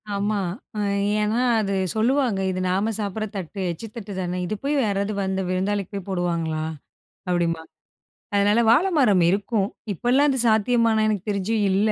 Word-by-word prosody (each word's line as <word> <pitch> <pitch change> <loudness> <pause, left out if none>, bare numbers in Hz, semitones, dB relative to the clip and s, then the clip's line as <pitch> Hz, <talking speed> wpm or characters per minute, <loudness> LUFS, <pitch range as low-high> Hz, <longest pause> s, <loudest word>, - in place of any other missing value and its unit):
ஆமா, 205 +1 0 0.4
அ - - -1 0.4
ஏன்னா 215 +3 +1 0.2
அது 200 -2 -1 0.2
சொல்லுவாங்க, 240 -1 +2
"இது 185 - -3
நாம 195 +5 +1
சாப்பிடற 210 +1 -2
தட்டு, 190 0 -6
எச்சு 170 +7 -7
தட்டு 210 -3 -7
தானே, 180 0 -2
இது 215 - -2
போய் 285 +2 0
யாராவது 200 0 -1
வந்து 190 0 -1
விருந்தாளிக்கு 195 +2 -1
போய் 195 -1 -6
போடுவாங்களா?" 170 -4 -1 0.7
அப்டிம்பாங்க. 165 -2 -1 0.7
அதனால, 205 +2 +3
வாழைமரம் 265 - +4
இருக்கும். 200 +1 0 0.3
இப்பலாம் 255 - +2
அது 265 - +1
சாத்தியமான்னா, 220 0 +3
எனக்கு 210 -1 -2
தெரிஞ்சு 200 +2 -1 0.2
இல்ல. 205 +3 +2
205 Hz, 145 wpm, -23 LUFS, 185-225 Hz, 0.7 s, வாழைமரம்